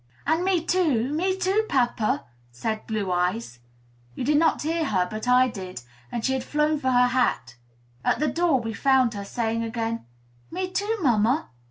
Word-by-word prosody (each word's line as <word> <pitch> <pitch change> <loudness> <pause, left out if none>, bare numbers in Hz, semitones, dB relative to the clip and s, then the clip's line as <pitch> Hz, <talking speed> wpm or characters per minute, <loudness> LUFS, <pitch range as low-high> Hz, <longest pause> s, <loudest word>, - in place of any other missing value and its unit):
"And 320 +3 +1
me 365 -3 +1
too, 295 -9 +1
me 375 +4 0
too, 385 +3 +1
papa!" 240 -4 +1 0.3
said 215 - -4
Blue 210 -4 -2
Eyes. 180 - -1 0.6
You - - -4
did 295 +3 +3
not 325 - +2
hear 325 +1 0
her; 185 -8 +1
but 215 +5 -6
I 250 +1 +5
did, 185 - -7 0.3
and 230 - -3
she 265 - +2
had 260 -1 -1
flown 300 +2 +1
for 260 - 0
her 250 0 +4
hat. 240 - 0 0.5
At - - +2
the 305 - +1
door 325 -1 +2
we 225 -1 -4
found 260 -2 +3
her, 200 -1 -5
saying 230 +2 -2
again, 230 - -3 0.4
"Me 370 +2 -3
too, 410 +4 -1
mamma!" 240 +2 +2
250 Hz, 180 wpm, -25 LUFS, 220-315 Hz, 0.6 s, I